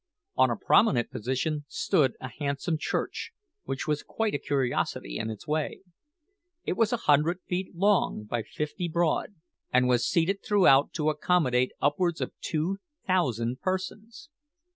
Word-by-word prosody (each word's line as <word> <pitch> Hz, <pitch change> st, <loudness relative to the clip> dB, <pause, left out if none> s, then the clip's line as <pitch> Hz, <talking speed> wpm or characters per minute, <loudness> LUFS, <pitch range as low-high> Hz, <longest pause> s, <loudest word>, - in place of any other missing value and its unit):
On 130 Hz, 0 st, +4 dB
a 120 Hz, -, 0 dB
prominent 125 Hz, -, +3 dB
position 140 Hz, +6 st, -2 dB
stood 135 Hz, -3 st, +1 dB
a 130 Hz, -, -5 dB
handsome 145 Hz, +3 st, -1 dB
church, -, -, -3 dB, 0.3 s
which 135 Hz, -, -4 dB
was 150 Hz, -1 st, 0 dB
quite 225 Hz, -1 st, -2 dB
a 145 Hz, -, 0 dB
curiosity 125 Hz, -, -1 dB
in 110 Hz, -, -2 dB
its 110 Hz, +6 st, -8 dB
way. 155 Hz, 0 st, -2 dB, 0.8 s
It -, -, -1 dB
was 220 Hz, +3 st, +2 dB
a 240 Hz, -, +1 dB
hundred 150 Hz, +4 st, +4 dB
feet 185 Hz, 0 st, -3 dB
long 195 Hz, -, +2 dB
by 115 Hz, +2 st, -2 dB
fifty 150 Hz, -, -4 dB
broad, 170 Hz, +4 st, 0 dB, 0.4 s
and 125 Hz, 0 st, +4 dB
was 125 Hz, -1 st, +2 dB
seated 185 Hz, +4 st, +1 dB
throughout 180 Hz, -10 st, +5 dB
to 155 Hz, -1 st, +1 dB
accommodate 145 Hz, -6 st, +1 dB
upwards 165 Hz, +4 st, +1 dB
of -, -, -3 dB
two 170 Hz, +5 st, -1 dB, 0.3 s
thousand 130 Hz, -, 0 dB
persons. 210 Hz, -, -4 dB
150 Hz, 145 wpm, -28 LUFS, 130-185 Hz, 0.8 s, throughout